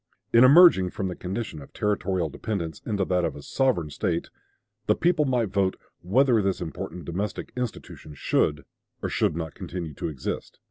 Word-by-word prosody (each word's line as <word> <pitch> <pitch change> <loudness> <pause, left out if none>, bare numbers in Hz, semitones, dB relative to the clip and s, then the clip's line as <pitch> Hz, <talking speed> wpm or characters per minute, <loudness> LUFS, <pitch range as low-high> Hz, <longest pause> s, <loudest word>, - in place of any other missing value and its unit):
"In 115 +1 +8
emerging 140 - +7
from 95 +1 -3
the 90 - -5
condition 95 -4 -5
of 70 - -14
territorial 95 -4 0
dependence 85 +1 -4
into 100 -4 0
that 90 -1 +1
of - - -1
a 70 - -10
sovereign 115 - 0
State," - - -2 0.6
the - - +4
people 170 -3 +2
might 125 -5 +1
vote 95 -1 +1 0.3
"whether 120 +5 +3
this 95 -1 0
important 90 0 -6
domestic 95 +4 -4
institution 120 -10 -6
should 75 +2 0 0.4
or - - -1
should - - +1
not 80 -2 -4
continue 85 -4 -6
to - - -4
exist." 70 -5 -5
95 Hz, 170 wpm, -26 LUFS, 85-115 Hz, 0.6 s, In